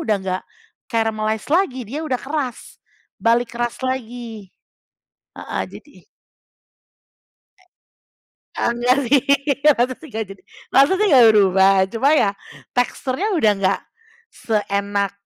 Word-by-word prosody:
udah 215 -2 0
enggak 185 0 -3 0.5
caramalize 220 -2 -1
lagi, 340 -7 +1
dia 285 +7 -4
udah 260 -5 -1
keras, 275 -4 -5 0.4
balik 230 +4 +1
keras 240 0 -2
lagi 240 -5 -5 0.9
heeh, - - -4
jadi - - -14 2.6
E - - -5
enggak 240 +2 +2
sih, 275 0 +4 0.4
maksudnya 265 +1 +2
enggak 220 0 -3
jadi 195 -1 -12 0.3
maksudnya 375 +10 +4
enggak 260 -8 +7
berubah, 195 -2 +4 0.2
cuma 230 +7 0
ya 255 -10 +3 0.5
teksturnya 260 - -1
udah 215 - +4
enggak 195 -1 0 0.5
seenak 200 - -2
235 Hz, 105 wpm, -20 LUFS, 205-260 Hz, 2.6 s, enggak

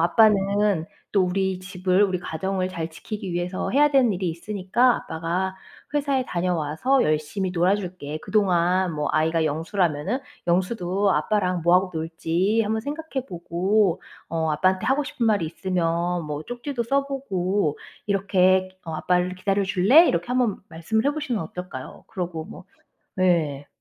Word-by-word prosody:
아빠는 200 -2 +3 0.3
또 195 -2 +4
우리 190 0 0
집을 185 +1 +1
우리 185 -2 -1
가정을 185 +3 -2
잘 165 -3 -4
지키기 200 +2 -6
위해서 175 +2 -2
해야 295 +3 +4
되는 260 -6 +4
일이 180 -1 -2
있으니까 205 +7 +1
아빠가 175 +4 -3 0.4
회사에 280 -3 +1
다녀와서 175 - +1
열심히 155 +5 -1
놀아 180 +2 +2
줄게. 175 -6 -6
그동안 185 -3 +2
뭐" 150 -1 -1
아이가 160 +1 +2
영수라면은 165 - -1 0.3
"영수도 185 +2 +1
아빠랑 180 +1 0
뭐 175 +1 +4
하고 185 0 +1
놀지 170 +6 0
한번 220 +1 -1
생각해 285 -1 -5
보고 180 +2 +1 0.3
어 160 -1 -1
아빠한테 185 +4 +1
하고 275 +2 +2
싶은 235 -4 -2
말이 205 -7 +2
있으면 175 -1 -1
뭐 150 0 -4
쪽지도 245 - -4
써 275 +3 +1
보고 195 - -1 0.3
이렇게 185 -2 +2
어 160 - -5
아빠를 180 +3 0
기다려 195 +2 0
줄래?" 205 - +5
이렇게 170 +6 -1
한번 250 -4 +1
말씀을 170 +8 -1
해 - - +4
보시면 270 - -2
어떨까요? 160 -5 -8
그러고 175 -6 -4
뭐 - - -11 0.5
네. 160 -7 +1
185 Hz, 330 characters per minute, -24 LUFS, 170-210 Hz, 0.5 s, 줄래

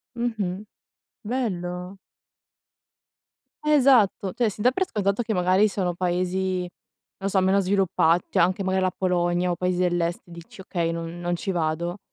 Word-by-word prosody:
Mh-mh. 215 -5 -3 0.6
Bello. 185 -6 -3 1.7
Esatto, 255 -10 +4
cioè, 235 -3 +1
si 210 - -8
dà 250 - +4
per 375 +7 -1
scontato 200 +1 0
che 220 -3 -2
magari 185 +4 +3
sono 185 -3 -1
paesi 185 +1 -1
non 180 - -6 0.6
lo - - +2
so, 190 - +2
meno 190 +1 +3
sviluppa 185 -3 +2
cioè - - +1
anche 185 +3 +2
magari 190 0 0
la 185 - +2
Polonia, 175 -1 0
o - - -1
paesi 180 0 -1
dell'Est, 175 -1 0
dici: 170 +2 -12
"Okay, 170 -3 -2
non 165 +1 -5
non 175 0 -1
ci 195 +3 -3
vado." 170 +2 -1
185 Hz, 155 wpm, -24 LUFS, 175-200 Hz, 1.7 s, Esatto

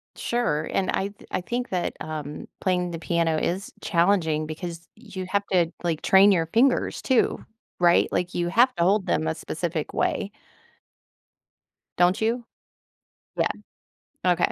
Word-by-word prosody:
Sure. 235 -11 -1
And 190 - 0
I 195 +1 -1
th 205 - -18
I 185 - -1
think 245 +7 -3
that, 180 -2 -2
um, 150 -2 -6
playing 180 -2 0
the 165 - -5
piano 165 -2 +1
is 185 +5 -2
challenging 170 -4 +2
because 170 +1 -7
you 205 -5 -7
have 200 +1 0
to, 175 -3 +3
like, 165 -3 -1
train 195 +1 +6
your 165 -3 +2
fingers 245 +9 +2
too, 260 -3 +1 0.4
right? 175 -1 +4
Like, 180 0 -1
you 175 0 -1
have 245 +6 +4
to 170 - +1
hold 195 +2 +3
them 160 - 0
a 160 - -1
specific 160 0 -4
way 200 0 -1 1.7
don't 180 +1 +4
you? 235 +2 0 0.9
Yeah. - - +2 0.8
Okay. 175 - +1
180 Hz, 150 wpm, -25 LUFS, 165-200 Hz, 1.7 s, train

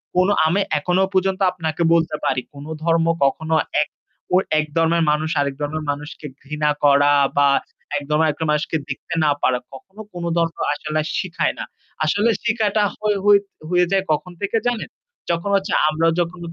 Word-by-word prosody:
কোন 185 +1 +4 0.2
আমি 185 +5 +2 0.2
এখনো 180 +4 +1
পর্যন্ত 190 +1 +1
আপনাকে 165 -1 -2
বলতে 165 -2 +2
পারি 130 -1 +1
কোন 140 +1 -10 0.2
ধর্ম 165 0 +2 0.2
কখনো 160 +3 0 0.3
এক 150 - -2 0.5
অ - - +7 0.2
এক 155 - 0
ধর্মের 165 0 +3
মানুষ 155 +1 0
আরেক 140 -1 -2
ধর্মের 150 +1 -3
মানুষকে 150 +2 -8 0.2
ঘৃণা 150 +1 -1
করা 145 0 +5 0.2
বা 145 - +5 0.5
এক 145 - -4
ধর্মের 155 0 +3 0.2
মানুষকে 150 +1 0
দেখতে 140 +6 -6
না 150 - +4
পারা 125 -1 +2
কখনো 190 +10 -12
কোন 175 -1 -6
ধর্ম 165 0 +1 0.2
আসলে 155 +1 -2 0.2
শেখায় 175 -3 -1
না। - - -3 0.4
আসলে 205 +8 +2
শেখাটা 220 -2 +1
হ - - -31 0.7
হয়ে 180 0 +3
যায় 195 -1 +2
কখন 165 +4 -1
থেকে 200 +3 0
জানেন? 240 -2 -2 0.4
যখন 170 +4 -2
হচ্ছে 195 +1 0 0.2
আমরা 160 +2 +1
যখন 175 +1 -2
165 Hz, 165 wpm, -21 LUFS, 150-180 Hz, 0.7 s, অ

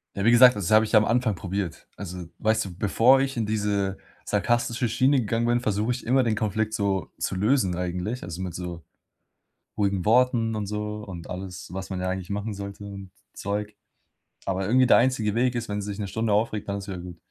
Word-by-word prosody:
Ja, 100 - -2
wie 115 - +6
gesagt, 125 -1 +7
das 95 -4 -2
habe 110 0 +7
ich 110 +1 -5
am 105 - +5
Anfang 115 -4 +1
probiert. 95 -2 -4
Also, 90 -2 -7
weißt 110 0 +1
du, 90 -3 -8
bevor 115 +7 +4
ich 135 -2 -2
in 115 - 0
diese 100 -2 -1 0.3
sarkastische 120 +3 0
Schiene 130 +5 +3
gegangen 115 +1 0
bin, 120 0 +2
versuche 105 +2 0
ich 125 - -7
immer, 130 +3 +4
den 110 -2 +1
Konflikt 110 +1 -1
so 100 -4 -1
zu - - -2
lösen 105 -2 +2
eigentlich, 90 +7 -3
also 85 +1 -6
mit 90 -2 -4
so 90 -2 -6 0.9
ruhigen 100 -3 0
Worten 115 0 +3
und 105 -2 -3
so 105 0 -4
und 90 -4 -8
alles, 90 +1 -7
was 95 0 -6
man 95 -1 -3
ja 90 - -1
eigentlich 95 0 -4
machen 105 +1 -3
sollte 100 +1 -7
und 100 -2 -8 0.2
Zeug. 105 +1 -3 0.7
Aber 95 0 -1
irgendwie 130 +3 +4
der - - +7
einzige 115 -4 +2
Weg 125 +2 +1
ist, 115 -1 -3
wenn 105 0 -2
sie 100 - -6
sich 100 - -7
'ne 100 - -3
Stunde 110 0 0
aufregt, 105 -1 0
dann 100 0 -2
ist 100 - -9
wieder 95 - -4
gut. 90 -1 -9
105 Hz, 215 wpm, -25 LUFS, 95-115 Hz, 0.9 s, gesagt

